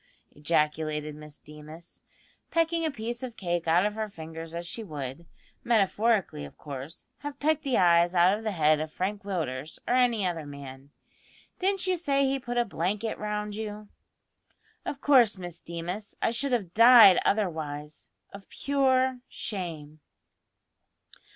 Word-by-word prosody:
ejaculated 150 0 -1
Miss 150 0 -11
Deemas, 155 +2 -12 0.5
pecking 330 0 +1
a 320 - +1
piece 240 -2 -4
of 250 -3 -7
cake 175 -2 -2
out 175 +4 +4
of 210 - 0
her 215 0 -3
fingers 165 -2 -8
as 170 0 -4
she 225 +6 -5
would, 150 -2 -7 0.4
metaphorically 215 - +1
of 70 - -11
course, 140 +2 -8
have 290 -1 -7
pecked 310 +1 +1
the 270 -5 0
eyes 175 0 +4
out 180 +3 +5
of 220 - -8
the 220 - -1
head 155 -3 +3
of 155 0 -4
Frank 200 +4 -3
Willders, 155 -7 -4
or - - +1
any 245 -5 +3
other 165 -4 -3
man. 140 -1 -10 0.7
"Didn't 385 0 0
you 370 -1 +1
say 275 -4 +1
he 270 0 0
put 245 -1 -5
a 240 - +3
blanket 205 +3 -2
round 210 0 -3
you?" 210 -1 -6 1.0
"Of 275 - -4
course, 245 -8 +5
Miss 175 -2 -7
Deemas; 175 +5 -6
I - - +1
should 270 +4 -1
have 195 -8 -1
died 230 -4 +9
otherwise 155 -7 -2 0.2
of 200 -1 -12
pure 260 -2 +1
shame." 160 -7 -6
195 Hz, 150 wpm, -28 LUFS, 160-235 Hz, 1.0 s, died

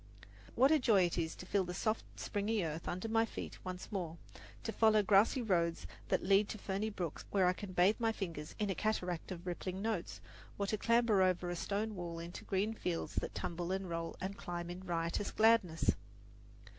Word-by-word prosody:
What 265 +4 +5
a 310 - +5
joy 210 -7 +5
it 175 0 0
is 160 -1 -2
to - - -9
feel 195 +1 +1
the 180 0 -5
soft, 215 +3 0 0.2
springy 205 0 0
earth 160 0 -4
under 185 +5 -2
my 225 0 +3
feet 225 - -6
once 185 +2 -6
more, 175 -5 -3 0.5
to 225 - -2
follow 220 -1 +4
grassy 210 +6 +4
roads 170 -5 +1 0.2
that - - +1
lead 200 +2 +4
to - - -4
ferny 200 +2 -2
brooks 175 -7 -4
where 195 -2 +3
I 180 - +4
can 185 0 -7
bathe 185 +6 +4
my 225 -1 +2
fingers 165 -8 -5
in 205 -2 0
a - - +1
cataract 180 -4 -1
of 175 -1 -6
rippling 185 +1 -3
notes, 210 -4 -2 0.4
or 200 - 0
to 215 +2 -1
clamber 230 -3 +4
over 180 -1 +2
a - - -2
stone 205 +5 -2
wall 175 -3 -5
into 170 +1 -7
green 200 +3 0
fields 180 -6 -3
that - - -5
tumble 175 +1 -3
and 190 0 -1
roll 165 -1 -3
and 190 +2 -3
climb 175 -1 -5
in 180 +1 -7
riotous 170 +2 -1
gladness! 220 -7 +4
190 Hz, 200 wpm, -35 LUFS, 175-215 Hz, 0.5 s, What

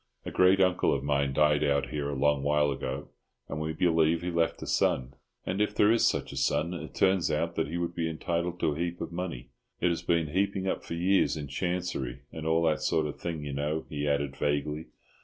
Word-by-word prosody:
A - - -4
great 95 +1 +5
uncle 90 -1 +3
of 70 - -3
mine 70 -1 +1
died 75 +1 +3
out 70 -2 +1
here 70 -1 -2
a 70 - -3
long 75 +1 +2
while 75 0 +2
ago, 70 +1 -4 0.4
and 75 - -4
we 80 0 -2
believe 80 0 +2
he 90 - -2
left 85 -1 0
a - - -5
son; 65 0 +1 0.3
and 95 +3 -1
if 105 0 0
there 105 +1 +5
is 115 - +3
such - - -1
a - - -7
son, 85 +3 +1
it 80 -3 -7
turns 95 -2 +3
out - - 0
that - - -1
he 85 +4 -3
would 85 0 -2
be 85 -1 -1
entitled 85 +2 -2
to - - +2
a 75 - -7
heap 85 0 -2
of - - -5
money. 85 -9 -5 0.3
It 90 - +2
has 85 - -1
been 85 -3 +1
heaping 95 +3 0
up - - -1
for 85 - -5
years 90 0 +2
in 75 -1 -5
Chancery, 85 -5 -2
and 80 -1 -5
all 80 +1 +3
that 75 -4 +2
sort 80 -1 +1
of 75 - -5
thing, 80 -3 -4
you 70 - -4
know," 75 +3 -2
he 75 -1 -2
added, 70 -1 0
vaguely. 75 +2 -1
80 Hz, 230 wpm, -29 LUFS, 75-85 Hz, 0.4 s, great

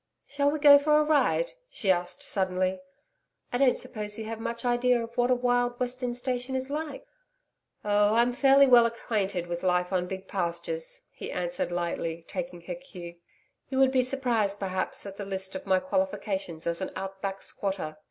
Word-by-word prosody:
'Shall 285 +1 +1
we 300 - -1
go 285 -1 +8
for 300 +1 +3
a - - +4
ride?' 310 - +2 0.2
she 195 - +1
asked 180 -1 -1
suddenly. 185 -1 0 0.7
'I 245 - +1
don't 270 -2 +4
suppose 210 -2 -3
you 220 - -5
have 225 0 -5
much 235 +2 -4
idea 245 0 +3
of 230 0 -6
what 245 0 +2
a 255 - +4
wild 245 0 +1
western 250 -1 -2
station 250 +1 -2
is 260 +1 -2
like.' 300 -2 -4 0.8
'Oh, 205 +1 +3
I'm 240 +1 +3
fairly 275 +2 +6
well 240 -3 +7
acquainted 200 -6 -2
with 175 0 -4
life 180 0 +1
on 180 -1 0
big 190 +1 -6
pastures,' 485 - -2
he - - -7
answered 175 0 -2
lightly, 170 -1 -3
taking 175 0 -6
her 180 +1 -5
cue. 175 0 -10 0.5
'You 265 - -3
would 265 0 +5
be 260 -1 +3
surprised, 245 -6 0
perhaps, 190 0 -2
at 200 -1 -8
the 205 - -5
list 190 -1 -4
of 190 - -7
my 190 -1 +4
qualifications 200 - -2
as 170 +2 -1
an 190 - -2
"out 190 0 -6
back 195 -1 -4
squatter." 190 -6 -3
215 Hz, 185 wpm, -28 LUFS, 185-255 Hz, 0.8 s, go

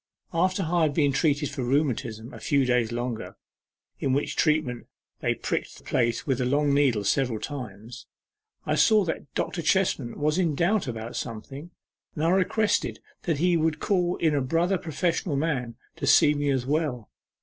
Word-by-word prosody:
After 185 +3 +1
I 170 +1 +1
had 150 -3 +2
been 145 -3 +3
treated 145 0 +1
for 135 -2 -4
rheumatism 125 -3 -1
a - - -9
few 140 -3 +2
days 125 -2 +1
longer 120 -1 -4 0.6
(in 135 - 0
which 140 - -1
treatment 150 -6 +1 0.3
they - - 0
pricked - - -3
the - - -16
place 115 0 0
with 135 -3 0
a - - +2
long 145 +2 +2
needle 135 -7 +2
several 115 +2 +1
times,) 120 -3 -7 0.6
I - - 0
saw 215 -2 +5
that 160 -3 -4
Dr. 175 - -2
Chestman 160 -8 +1
was 150 +4 +1
in 165 -5 +1
doubt 175 +2 +1
about 115 -1 -5
something, 135 +7 -6 0.5
and 150 - -2
I 165 - +3
requested 205 +3 +1 0.3
that 165 -4 +1
he 175 +3 +2
would 160 -1 +1
call 180 -3 +1
in 160 -2 +1
a 145 - +1
brother 170 +7 +1
professional 165 0 -1
man 135 -6 -1 0.2
to - - -3
see 150 - +6
me 145 -1 -1
as 130 -3 0
well. 140 -6 -1
145 Hz, 175 wpm, -26 LUFS, 125-165 Hz, 0.6 s, see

